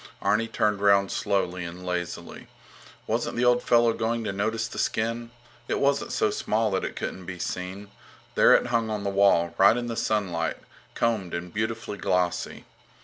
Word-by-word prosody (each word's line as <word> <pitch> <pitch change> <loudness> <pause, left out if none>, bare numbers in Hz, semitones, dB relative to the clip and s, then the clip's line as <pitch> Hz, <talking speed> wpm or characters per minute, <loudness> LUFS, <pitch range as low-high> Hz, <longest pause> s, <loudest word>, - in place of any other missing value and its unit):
Arni 115 +2 +1
turned 105 -3 0
round 100 -1 +4
slowly 95 -3 -1
and 85 +2 -8
lazily. 90 -1 -5 0.6
Wasn't - - -1
the 125 - +2
old 125 0 +4
fellow 120 -1 +4
going 115 +1 -1
to 105 -3 -3
notice 110 +3 -1
the - - -7
skin? 115 +1 -1 0.4
It - - 0
wasn't 140 0 +1
so 110 - +1
small 110 +1 0
that 95 - 0
it - - -4
couldn't 90 -2 -5
be 95 -1 -5
seen. 95 +3 -5 0.4
There - - +6
it - - +2
hung 115 -1 +1
on 105 -2 -3
the 100 - -1
wall, 95 -4 +3
right 100 +5 +6
in 120 - -2
the 115 -1 -4
sunlight, 95 -8 -1 0.4
combed 105 -7 0
and 85 0 -6
beautifully 110 -1 -3
glossy. 90 -1 -1
100 Hz, 175 wpm, -26 LUFS, 90-115 Hz, 0.6 s, There